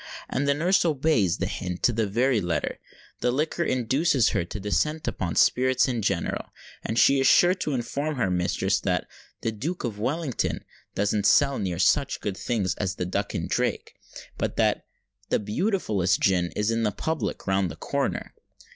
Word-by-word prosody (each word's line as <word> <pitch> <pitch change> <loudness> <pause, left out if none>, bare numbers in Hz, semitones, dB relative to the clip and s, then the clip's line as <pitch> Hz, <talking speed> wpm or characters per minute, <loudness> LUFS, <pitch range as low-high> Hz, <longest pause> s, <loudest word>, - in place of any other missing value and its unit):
And 140 +2 -1
the 140 - +3
nurse 175 +6 +3
obeys 145 - +2
the - - -1
hint 90 -1 -5
to 120 - +4
the 110 -1 0
very 120 +3 +2
letter. 85 -4 -2 0.4
The - - +1
liquor 155 +6 0
induces 130 +1 +2
her - - 0
to 105 +5 -7
descant 150 +10 -1
upon 85 -3 -2
spirits 130 +1 +3
in 120 -3 -1
general; - - -1 0.4
and 110 - -3
she 140 +2 +5
is 135 - +3
sure 180 +1 +6
to 170 -5 -3
inform 140 +5 -2
her 115 -8 0
mistress 90 0 0
that - - -1 0.4
the 115 - -1
Duke 150 - -4
of 110 -5 -4
Wellington 135 +3 -2 0.3
doesn't 105 0 +1
sell 140 +7 +4
near 90 -4 -2
such 100 - +2
good 100 -3 -3
things 100 -6 -1
as 95 -2 -2
the 90 - -3
Duck 100 +3 -2
and - - -2
Drake; - - -1 0.5
but - - -2
that - - +1 0.4
"the - - +3
beautifullest 105 - 0
gin 90 -2 +2
is 105 +2 +1
at 115 0 0
the 105 - +1
public 160 +8 -3
round 95 -1 +1
the 70 - -7
corner." - - -3
115 Hz, 180 wpm, -26 LUFS, 100-140 Hz, 0.5 s, sure